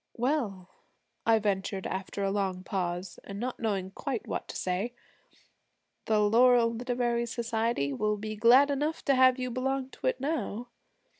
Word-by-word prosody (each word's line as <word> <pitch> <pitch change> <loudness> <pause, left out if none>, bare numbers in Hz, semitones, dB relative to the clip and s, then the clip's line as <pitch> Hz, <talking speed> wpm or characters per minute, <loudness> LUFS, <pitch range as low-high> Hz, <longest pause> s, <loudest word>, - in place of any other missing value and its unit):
'Well,' 230 -8 -1 0.6
I 225 -1 +6
ventured 195 -2 -1
after 195 +1 -3
a 195 - +1
long 190 -2 -1
pause, 180 -1 -3
and 200 0 -7
not 250 +2 -3
knowing 195 -4 -1
quite 255 +2 -4
what - - -4
to - - -8
say, 190 +6 -2 1.1
'the 215 -1 +2
Laurel 230 +2 +5
Literary 240 0 -1
Society 230 - -1
will 210 +9 0
be 215 +1 -5
glad 250 +6 +6
enough 295 +3 -2
to 280 - +4
have 255 -1 +5
you 255 -1 -3
belong 265 +1 -2
to - - -4
it - - +1
now.' 245 -6 -3
230 Hz, 155 wpm, -29 LUFS, 200-255 Hz, 1.1 s, I